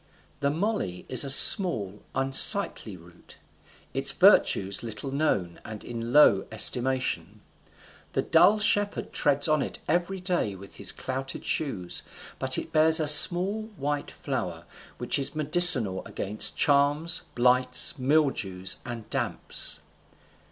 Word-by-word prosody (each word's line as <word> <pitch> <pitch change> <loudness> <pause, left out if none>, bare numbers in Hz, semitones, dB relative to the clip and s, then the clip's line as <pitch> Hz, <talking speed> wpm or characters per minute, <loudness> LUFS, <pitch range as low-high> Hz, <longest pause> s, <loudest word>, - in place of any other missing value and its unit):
The 140 - -2
moly 160 - -5
is 130 - +1
a 140 - -7
small 110 - +3
unsightly 135 - +4
root, 85 0 -20 0.6
its - - -2
virtues 95 0 +1
but - - -11
little 115 +5 -9
known 100 - -4
and 110 -1 -11
in 115 0 -8
low 135 -9 +3
estimation; 125 +4 0 0.7
the - - -2
dull 205 +4 +2
shepherd 205 -1 -2
treads 145 +1 +1
on 155 -2 -1
it - - -6
every 175 +4 -3
day 180 - -4
with 100 +1 -14
his - - +2
clouted 135 0 -8
shoes; 105 - -5 0.4
but - - -1
it - - -8
bears 160 +1 +4
a 155 - -2
small 180 +8 +5
white 145 +1 -5
flower, - - -7 0.3
which - - -1
is 140 - -3
medicinal 150 - +3
against 105 +2 -2
charms, 145 +4 0
blights, 125 +3 +3
mildews, 125 -10 -2
and 120 -3 -10
damps. - - -2
135 Hz, 130 wpm, -24 LUFS, 110-160 Hz, 0.7 s, small